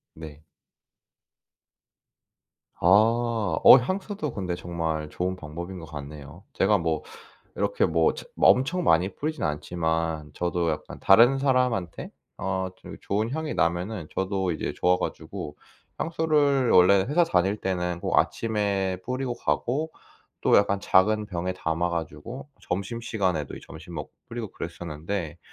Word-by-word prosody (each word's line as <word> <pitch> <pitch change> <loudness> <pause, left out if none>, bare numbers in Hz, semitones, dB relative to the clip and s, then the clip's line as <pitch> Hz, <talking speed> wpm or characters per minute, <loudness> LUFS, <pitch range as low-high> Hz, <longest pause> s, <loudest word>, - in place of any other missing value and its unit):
네. 80 -1 -11 2.4
아. 110 +3 +3
어 - - +11
향수도 185 - -3
근데 90 -3 -3
정말 80 -3 -3
좋은 90 +3 -2
방법인 85 +3 -7
것 80 - -9
같네요. 75 +2 -9
제가 105 +2 +3
뭐 80 -3 -1 0.5
이렇게 - - +1
뭐 80 0 +2
처 - - -8
뭐 - - +5
엄청 160 +8 +1
많이 90 - +3
뿌리진 155 +1 -4
않지만 80 0 -2
저도 85 -1 0
약간 75 - -5
다른 120 +7 +6
사람한테 125 - 0 0.3
어 95 -1 -2
좀 - - -11
이 - - -13
좋은 105 +3 -1
향이 160 -1 -3
나면은 90 +2 -1
저도 95 -1 -1
이제 80 - -3
좋아 90 0 +2
가지고. 75 - -5 0.4
향수를 150 -6 +2
원래 95 +2 +6
회사 170 +5 +4
다닐 95 - +1
때는 90 -3 -2
꼭 - - +2
아침에 100 -4 0
뿌리고 130 0 -2
가고 135 +5 -1 0.5
또 - - +4
약간 100 -1 +1
작은 105 +3 +3
병에 90 -2 -3
담아 85 0 -1
가지고 85 - -6
점심시간에도 95 - -2
이 - - -9
점심 80 +2 -11
먹고 75 -2 -6 0.2
뿌리고 115 -2 -5
그랬었는데 85 +1 -5
95 Hz, 275 characters per minute, -26 LUFS, 85-115 Hz, 2.4 s, 어